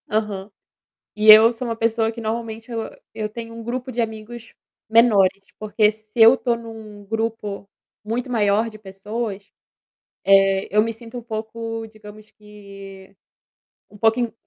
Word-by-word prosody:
Aham. 210 -2 -2 0.7
E 215 0 +6
eu 220 +2 +9
sou 240 +2 -6
uma 230 - -3
pessoa 225 0 0
que 230 - -9
normalmente 225 +1 -5
eu 230 -1 -3 0.3
eu 215 -1 -3
tenho 230 +1 -8
um 230 - -8
grupo 250 +2 -4
de 245 -1 -3
amigos 225 +1 -6 0.3
menores, 215 -4 +4 0.2
porque 215 0 +2
se 215 +1 -8
eu 225 +3 +9
estou 245 -2 0
em 235 0 -9
um 215 -2 -11
grupo 220 -2 -4 0.4
muito 240 +4 -3
maior 215 -1 +1
de 215 - -13
pessoas, 205 +1 -6 0.8
eh, 195 0 +4
eu 210 - +6
me 230 +1 -1
sinto 230 +1 -10
um 240 - -7
pouco, 225 0 -5
digamos 215 0 -14
que 195 -2 -13 0.7
um 210 - -15
pouquinho 225 +1 +1
220 Hz, 155 wpm, -21 LUFS, 210-230 Hz, 0.8 s, eu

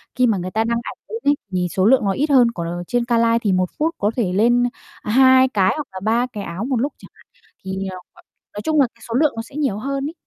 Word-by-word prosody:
khi 250 -1 +3
mà 220 -4 +1
người 185 0 -5
ta 220 +3 +1
đăng 235 +1 0
ảnh - - -7
lên 450 - -4
ấy 285 0 +3 0.2
thì 180 -1 0
số 190 0 +1
lượng 260 0 +5
nó 195 - +2
ít 290 +10 -1
hơn, 250 -4 +5
còn 170 -7 -5
ở 175 +1 -4
trên 245 -1 0
ca 235 -1 +1
live 230 0 +3
thì 205 - +1
1 185 -1 +1
phút 320 +2 0
có 205 +1 0
thể 205 -8 -1
lên 240 +5 +3 0.4
2 260 +3 +5
cái 195 -6 +2
hoặc 300 -2 -5
là 190 - -7
3 230 +3 +2
cái 205 -2 -5
áo 175 +5 -5
một 265 0 -1
lúc, 285 - -1
chẳng - - -15
hạn - - -23 0.2
ấy, - - -30
thì, 190 0 -4
ờ, 185 - -6 0.2
gọi - - -19 0.3
nói 205 - -5
chung 310 -2 +2
là 265 - +3
cái 230 - -25
số 230 - -3
lượng 295 +3 +2
nó 225 - -3
sẽ 230 +4 -14
nhiều 275 -9 -1
hơn 275 +4 -3
ấy. 325 - -10
230 Hz, 300 wpm, -20 LUFS, 195-265 Hz, 0.4 s, lượng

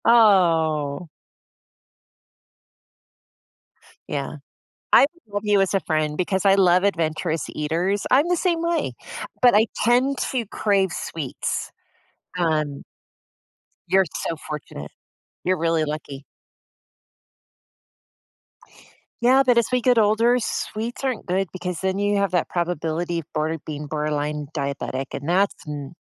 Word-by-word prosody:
Oh. 165 -9 +4 3.0
Yeah. 140 +1 -3 0.6
I - - +8
would 280 -8 -3
love 205 - -1
you 205 -1 +3
as 195 - +1
a 195 - +3
friend 155 -3 -1
because 190 +2 -1
I 195 -1 +5
love 180 -2 +4
adventurous 165 -3 0
eaters. 170 +7 -1
I'm 285 +6 +4
the 355 - +2
same 340 -2 0
way, 335 0 0 0.5
but 245 -3 +6
I 215 +2 +5 0.2
tend 250 +4 +3
to 245 -4 -1
crave 195 -2 +1
sweets. 150 -7 -4 0.7
Um 155 -4 0 1.1
You're 190 +2 +4 0.2
so 165 - -2
fortunate. 140 - -7 0.6
You're 185 +1 +2
really 165 -1 +1
lucky. 145 -2 -6 3.0
Yeah, 255 +3 +5
but 250 -2 +3
as 235 - +2
we 250 - +3
get 245 -1 +3
older, 225 +3 +4
sweets 230 +1 -4
aren't 260 -4 -2
good 185 0 0
because 180 -2 -4
then 190 0 -1
you 205 0 +1
have 200 -1 0
that 180 - +1
probability 170 0 -2
of 155 - -15
border 155 +1 -1
being 150 -1 -6
borderline 150 0 -2
diabetic, 140 -1 -3
and 140 +3 -5
that's 190 +3 +2
n 145 -2 -6
180 Hz, 125 wpm, -23 LUFS, 155-215 Hz, 3.0 s, I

